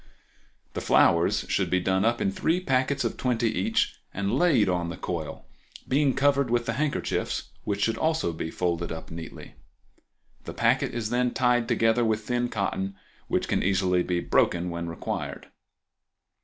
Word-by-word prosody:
The -, -, -3 dB
flowers 85 Hz, 0 st, +3 dB
should -, -, 0 dB
be 90 Hz, -, +2 dB
done 95 Hz, +1 st, +1 dB
up 120 Hz, +1 st, +2 dB
in 95 Hz, -, +1 dB
three 165 Hz, -, 0 dB
packets 135 Hz, -3 st, +1 dB
of -, -, -2 dB
twenty 120 Hz, -3 st, +1 dB
each 90 Hz, -, 0 dB
and 100 Hz, 0 st, -2 dB
laid 145 Hz, -, +4 dB
on 90 Hz, -2 st, 0 dB
the 85 Hz, -, -6 dB
coil, 80 Hz, -4 st, -5 dB, 0.4 s
being 135 Hz, 0 st, +2 dB
covered 140 Hz, -1 st, +2 dB
with 120 Hz, 0 st, +1 dB
the 115 Hz, -, -1 dB
handkerchiefs, 145 Hz, +3 st, -2 dB
which 100 Hz, -1 st, -1 dB
should 115 Hz, -, 0 dB, 0.4 s
be 80 Hz, -, -4 dB
folded 85 Hz, 0 st, -2 dB
up 80 Hz, 0 st, -7 dB
neatly. 80 Hz, 0 st, -9 dB, 0.9 s
The -, -, -7 dB
packet -, -, +1 dB
is 110 Hz, -2 st, -2 dB
then 125 Hz, 0 st, +1 dB
tied 125 Hz, -2 st, +2 dB
together 115 Hz, +1 st, +2 dB
with 110 Hz, -1 st, 0 dB
thin 120 Hz, 0 st, 0 dB
cotton, 100 Hz, -2 st, -2 dB, 0.3 s
which -, -, 0 dB
can -, -, +1 dB
easily 90 Hz, -1 st, +2 dB
be 90 Hz, 0 st, -1 dB
broken 90 Hz, 0 st, +1 dB
when 85 Hz, 0 st, -4 dB
required. 85 Hz, -, -5 dB
110 Hz, 160 wpm, -26 LUFS, 90-125 Hz, 0.9 s, laid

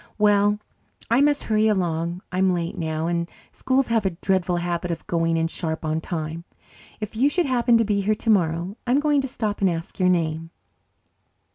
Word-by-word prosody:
Well, 205 Hz, -1 st, +3 dB, 0.5 s
I 240 Hz, +4 st, +5 dB
must 290 Hz, 0 st, +3 dB
hurry 215 Hz, 0 st, +2 dB
along. 175 Hz, -3 st, -1 dB
I'm 185 Hz, 0 st, +2 dB
late 170 Hz, -1 st, -3 dB
now, 160 Hz, -1 st, -2 dB
and 170 Hz, 0 st, -1 dB, 0.2 s
schools 260 Hz, -1 st, 0 dB
have 225 Hz, -2 st, +2 dB
a 195 Hz, -, +2 dB, 0.2 s
dreadful 185 Hz, -2 st, +1 dB
habit 175 Hz, 0 st, -2 dB
of 170 Hz, -, -4 dB
going 165 Hz, -1 st, 0 dB
in 165 Hz, 0 st, +1 dB
sharp 160 Hz, -1 st, -4 dB
on 155 Hz, +1 st, -1 dB
time. 160 Hz, -1 st, -4 dB, 0.6 s
If 215 Hz, 0 st, -6 dB
you 265 Hz, +6 st, +3 dB
should 350 Hz, +3 st, +1 dB
happen 240 Hz, -3 st, +3 dB
to 230 Hz, -, +2 dB
be 205 Hz, -1 st, +1 dB
here 215 Hz, +2 st, +1 dB
tomorrow, 185 Hz, -4 st, +1 dB
I'm 255 Hz, +3 st, +3 dB
going 295 Hz, -1 st, +2 dB
to 270 Hz, -, -3 dB
stop 215 Hz, -5 st, -3 dB
and 195 Hz, -, +4 dB
ask 165 Hz, +4 st, -5 dB
your 185 Hz, -1 st, +4 dB
name." 165 Hz, -2 st, 0 dB
185 Hz, 185 wpm, -23 LUFS, 165-220 Hz, 0.6 s, I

